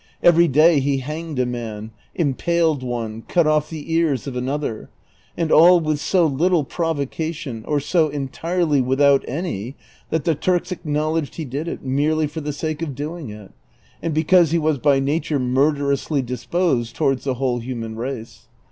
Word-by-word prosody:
Every 170 0 +6
day 155 +2 +5
ho 140 0 0
hanged 155 0 -5
a 125 - +2
man, 115 -3 -5 0.2
impaled 160 0 +1
one, 115 -3 -4
cut 170 -3 +2
oft' 155 0 +2
the 160 0 -6
ears 160 -5 +1
of 135 -3 -5
another; 130 -2 -3 0.5
and 165 -2 -1
all 175 +3 +7
with 155 -2 -1
so 175 +3 +2
little 160 +3 +2
provocation, 150 -5 -3
or 150 -1 +1
so 155 +2 +1
entirely 150 +2 0
without 135 +2 +3
any, 135 - -4 0.3
that 160 -1 -1
the 165 - +2
Turks 175 +4 0
acknowledged 155 -3 -2
he 160 - -4
did 140 +5 -4
it - - -5
merely 150 +4 +1
for 150 +2 -5
tlie 150 -1 -4
sake 155 +1 -3
of 150 -5 -4
doing 150 -1 -5
it, 105 -2 -11 0.5
and 165 - -2
because 165 +1 +4
he 170 - +1
was 155 -3 +1
by 140 0 +3
nature 145 +2 0
murderously 140 +2 +1
disposed 125 0 -1
towards 135 -4 0
the 135 -2 -1
whole 125 -1 -1
human 115 -2 -5
race. 120 -1 -6
145 Hz, 165 wpm, -21 LUFS, 130-160 Hz, 0.5 s, all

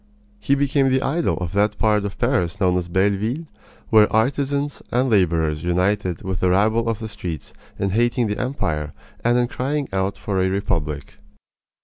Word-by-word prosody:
He 140 - +2
became 140 -1 +2
the 130 0 +2
idol 165 +5 0
of 90 -2 -4
that 105 +1 +1
part 105 -2 +2
of 100 0 -5
Paris 110 -8 0
known 90 -2 +2
as 90 -1 -1
Belleville, 100 - 0 0.5
where 110 -2 +6
artisans 140 +5 0
and 125 +1 +1
laborers 80 -6 +2
united 90 0 0
with 95 -1 -3
the 90 - +2
rabble 110 +5 +2
of 115 - -1
the 110 - -6
streets 90 -8 -6 0.2
in 100 0 -1
hating 120 +3 +2
the 105 -1 -2
empire 75 - -2 0.3
and 120 +1 +3
in 120 0 +2
crying 140 +3 -2
out 95 +1 -1
for 95 -2 -1
a 95 - +2
republic. 75 -7 -3
105 Hz, 170 wpm, -22 LUFS, 90-125 Hz, 0.5 s, where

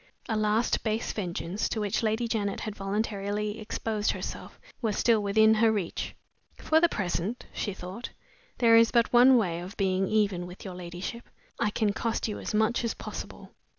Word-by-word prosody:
A 225 - -1
last 215 +2 +1
base 220 +1 -1
vengeance, 185 0 -3
to 220 - -2
which 205 +1 0
Lady 220 +1 0
Janet 205 -3 -1
had 215 -2 -4
voluntarily 205 +1 -2
exposed 215 -1 -2
herself, - - -7 0.2
was 220 -4 0
still 230 -3 +3
within 220 +2 +5
her 220 0 +4
reach. 200 -6 -3 0.4
"For 315 +1 +3
the 345 - +5
present," 195 - -2
she 205 -3 -3
thought, 190 +6 -7 0.5
"there 230 -2 +6
is 230 0 +6
but 235 -1 +2
one 250 +2 +8
way 175 -7 0
of 185 +4 -8
being 190 -1 +1
even 200 -5 +1
with 180 +3 -11
your 190 - -5
ladyship. 180 +6 -7 0.3
I 210 - +2
can 210 -1 0
cost 230 +2 -1
you 210 - -4
as - - -4
much 220 +3 +2
as 230 - -1
possible." - - -8
215 Hz, 180 wpm, -28 LUFS, 195-225 Hz, 0.5 s, one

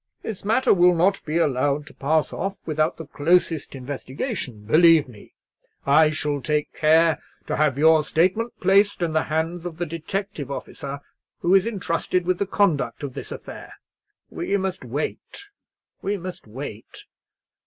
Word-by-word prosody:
This 215 -4 -6
matter 230 +5 +3
will 180 -1 +5
not 190 +4 +2
be 155 +1 -1
allowed 145 -1 +1
to - - -14
pass 155 +3 0
off 195 +2 -3
without 155 +1 0
the 160 - -7
closest 160 0 +1
investigation, 130 - -5
believe 160 +4 +5
me. 110 -5 -15 0.5
I 150 +3 +5
shall 150 -2 -2
take 150 +1 -1
care 160 +1 +3 0.2
to - - -2
have 150 -3 +2
your 160 +1 +5
statement 185 +10 0
placed 195 0 +3
in 165 -2 -1
the 155 - +3
hands 160 +2 -2
of 175 -3 -6
the 175 - -2
detective 170 0 -4
officer 140 0 -6 0.4
who 175 - +2
is 195 +2 +5
entrusted 180 -4 -1
with 185 0 0
the 200 - 0
conduct 185 -9 +1
of 140 -3 -4
this - - -8
affair. - - -9 0.6
We 200 - -1
must 190 -4 -3
wait—we 200 - -6
must 180 - -8
wait. 115 -1 -9
160 Hz, 155 wpm, -23 LUFS, 145-185 Hz, 0.6 s, will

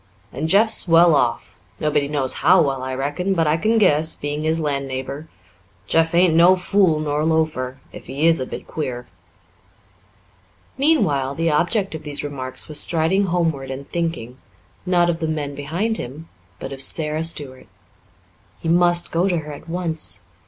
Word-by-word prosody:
And 155 +3 -3
Jeff's 215 +3 +3
well 165 0 +6
off 120 -9 -1 0.2
nobody 150 -2 0
knows 140 -3 +1
how 185 +3 +5
well, 135 -3 -2
I 130 0 -4
reckon, 145 +9 -2
but 165 -2 +2
I 150 0 +2
can 220 +7 +1
guess, 160 -6 +3
being 145 +1 -4
his 160 +1 +1
land 140 -3 -2
neighbour. 135 +3 -6 0.6
Jeff 165 +7 +1
ain't 175 -1 +4
no 170 +3 +6
fool 185 -3 +2
nor 150 0 -1
loafer, 155 -5 -1 0.2
if - - -11
he 145 +4 -2
is 165 0 +4
a 130 - -3
bit - - -7
queer." 125 -6 -5 1.7
Meanwhile, 150 - +1
the 165 +1 0
object 180 +6 0
of 160 - -6
these 145 -2 -5
remarks 130 -3 -5
was 150 -1 -2
striding 170 +4 +1
homeward 165 -6 -1
and 135 +1 -7
thinking, 165 -8 -4 0.5
not 175 -1 +3
of 170 -1 -1
the 160 - -2
men 150 -2 -3
behind 170 +11 -2
him, 145 +7 -8 0.3
but - - -7
of 135 - -9
Sara 155 +2 +1
Stuart. 145 -5 -2 0.9
He 165 - -4
must 175 0 +3
go 170 +3 +1
to 175 - 0
her 150 -2 -6
at 145 - -12
once. 165 -2 -2
155 Hz, 170 wpm, -21 LUFS, 140-170 Hz, 1.7 s, well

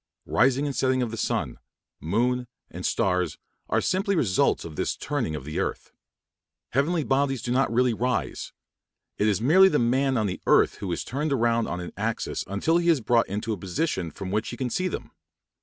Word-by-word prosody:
Rising 135 +3 +2
and 140 -2 -3
setting 130 -1 +2
of 115 -2 -4
sun, - - -2 0.4
moon, 125 +8 0 0.2
and 90 +1 -3
stars 90 -6 0 0.3
are - - +2
simply 195 +2 0
results 105 - +2
of 80 -2 -8
this - - -1
turning 130 - -2
of 70 - -7
the 75 - -3
earth. - - -3 0.8
Heavenly 155 +5 +1
bodies 135 -2 0
do 120 - -2
not 130 0 +2
really 125 +1 +3
rise; 125 +3 -2 0.7
it 105 - +3
is 105 -2 +2
merely 185 +10 +6
the 150 - +2
man 130 +2 +2
on 110 - +1
the 95 -2 -3
earth - - +4
who 95 -3 -4
is - - -2
turned 145 +4 -2
round 115 -2 +2
on 90 - -3
an 90 - -7
axis - - -2
until 100 - +1
he 170 0 +1
is 160 -4 +4
brought 115 0 +2
into 105 +3 -2
a - - -4
position 95 - -2
from 95 +4 -7
which 110 +2 -1
he 120 - -6
can 125 -2 -2
see 185 - 0
them. - - -5
120 Hz, 195 wpm, -26 LUFS, 100-140 Hz, 0.8 s, merely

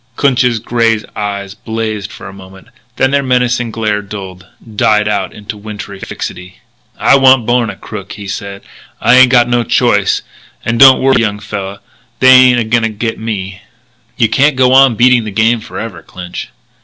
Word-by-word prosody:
Clinch's 125 -4 +1
grey 115 0 0 0.2
eyes 100 -2 -4
blazed 110 -2 -5
for - - -11
a 95 - -10
moment, 95 0 -15 0.3
then 130 - +1
their 140 0 +2
menacing 125 -2 0
glare 110 -2 -2
dulled, 95 -3 -9 0.3
died 105 0 +2
out 100 -3 -2
into 105 +1 -9
wintry 105 -2 -9
fixity. 90 -1 -8 0.4
"I - - +4
wan't 130 -3 +4
born 120 -1 +1
a - - -7
crook," 100 -2 -9
he 100 -1 -9
said. 100 0 -7 0.4
"I - - +3
ain't 130 0 +7
got 120 -2 +4
no 120 0 +1
choice. 105 -5 +1 0.4
And 115 0 -1
don't 135 -1 +8
worry, 135 -2 +3
young 105 -3 -1
fella; 100 -1 -7 0.4
they 130 - +5
ain't 130 -1 +6
a - - 0
going 115 +2 0
to 115 - 0
get 110 +1 -4
me." 100 -4 -5 0.6
"You 115 - +3
can't 140 +5 +2
go 130 0 +3
on 135 -3 +5
beating 125 +1 +3
the 110 - -5
game 115 +3 +1
forever, 105 -4 -8
Clinch." 90 -6 -9
110 Hz, 180 wpm, -13 LUFS, 100-125 Hz, 0.6 s, don't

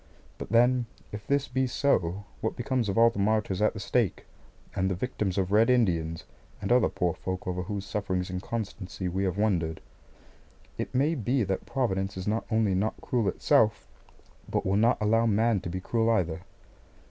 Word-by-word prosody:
But - - -6
then 120 +2 +3 0.2
if 105 0 -8
this 140 0 +1
be 130 +1 0
so, 100 -8 0 0.2
what 110 - -1
becomes 125 -2 -1
of 95 - -2
all 115 0 +6
the 100 - -6
martyrs 105 -1 +1
at 105 - +3
the - - -5
stake, 110 0 0 0.5
and 95 +1 +1
the 95 - -1
victims 100 -3 -2
of 95 -1 0
Red 110 +3 +5
Indians, 85 -10 +1 0.4
and - - -3
other 125 +1 +5
poor 90 -2 0
folk 95 +2 -5
over 90 0 -2
whose 100 +1 -4
sufferings 95 -2 -2
and 90 0 -3
constancy 100 -4 -4
we 95 +2 -1
have 95 0 -1
wondered? 85 -7 0 1.0
It - - -5
may 145 +5 +3
be 125 -2 0
that 95 -1 -3
Providence 95 -7 -1
is 95 - -5
not 110 +2 -1
only 110 -3 +2
not 100 +4 -1
cruel 120 -5 0
itself, 105 +3 +2 0.6
but - - -1
will 95 +1 +1
not 115 +4 +3
allow 115 +2 +3
man 110 0 +2
to 90 - -6
be 95 +2 -3
cruel 115 +4 0
either. 90 -7 +1
105 Hz, 185 wpm, -28 LUFS, 95-115 Hz, 1.0 s, all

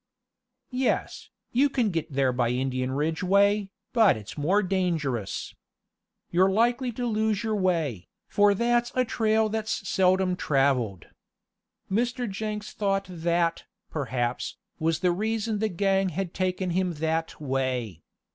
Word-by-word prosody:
"Yes, 255 +1 -1 0.2
you 275 +4 +3
can 245 -6 +1
git 165 -3 -3
there 135 -2 +2
by 120 -1 +1
Indian 130 +1 -1
Ridge 155 +4 -1
way, 200 +2 +3 0.2
but 220 - +5
it's 105 -1 -9
more 185 +8 +2
dangerous. 165 - -1 0.8
You're 185 +2 +4
likely 240 +5 +2
to 245 +2 -3
lose 220 -2 0
your 220 -1 0
way, 165 - 0 0.2
for 205 0 +4
that's 240 +2 +1
a 255 0 +2
trail 220 -1 +2
that's 215 -2 -3
seldom 185 0 +3
traveled." 135 - +1 0.8
Mr. 240 +4 0
Jenks 210 +1 -4
thought 195 -1 0
that, 170 0 0 0.3
perhaps, 125 -3 -2 0.2
was 160 0 0
the 180 -2 +3
reason 220 +3 -1
the 220 0 +1
gang 195 +1 +1
had 180 +1 -4
taken 185 -1 -1
him 180 0 0
that 160 +1 -2
way. 130 - -2
185 Hz, 135 wpm, -27 LUFS, 150-215 Hz, 0.8 s, but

